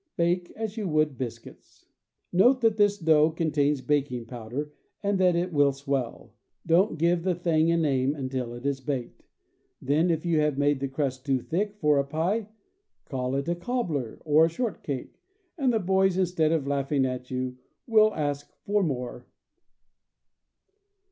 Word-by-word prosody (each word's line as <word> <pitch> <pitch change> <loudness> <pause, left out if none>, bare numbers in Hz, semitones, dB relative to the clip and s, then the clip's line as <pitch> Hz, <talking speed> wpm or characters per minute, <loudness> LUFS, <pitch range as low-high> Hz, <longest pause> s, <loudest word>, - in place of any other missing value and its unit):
Bake 175 +1 +1
as 220 -1 -5
you 210 -3 -2
would 155 -3 +1
biscuits. 120 -2 -9 0.5
Note 245 +9 +5
that 225 -2 +3
this 205 -1 +3
dough 160 -3 +4
contains 150 -3 0
baking 135 -5 -1
powder, 125 +5 -6 0.3
and 200 -1 +1
that 180 -2 +4
it 175 +1 -1
will 145 -1 +4
swell. 135 -3 -4 0.3
Don't 170 +2 +3
give 170 +2 +2
the 180 0 0
thing 165 -2 +2
a 170 - +3
name 140 -3 +1
until 130 -3 -4
it 120 +3 -10
is 140 -1 -1
baked; 130 -3 -4 0.6
then, 155 +6 +1
if 165 0 0
you 165 -2 +2
have 150 -2 +1
made 145 -1 +2
the 135 - -2
crust 135 -2 -3
too 135 -2 +1
thick 200 - -2
for 150 -4 +3
a - - +2
pie, 170 +10 -1 0.6
call 130 -1 -3
it 140 +2 -2
a 170 - +1
cobbler 175 - -3
or 155 +1 +5
a - - 0
shortcake, 165 - -4 0.3
and 275 -6 +1
the 230 - +2
boys, 190 -1 +2
instead 175 -4 +1
of 160 -4 0
laughing 140 0 0
at 125 -1 -4
you, 125 0 -3 0.3
will 215 -2 +5
ask 145 -1 -3
for 205 +1 +2
more. 130 -8 -3
155 Hz, 165 wpm, -27 LUFS, 135-180 Hz, 0.6 s, Note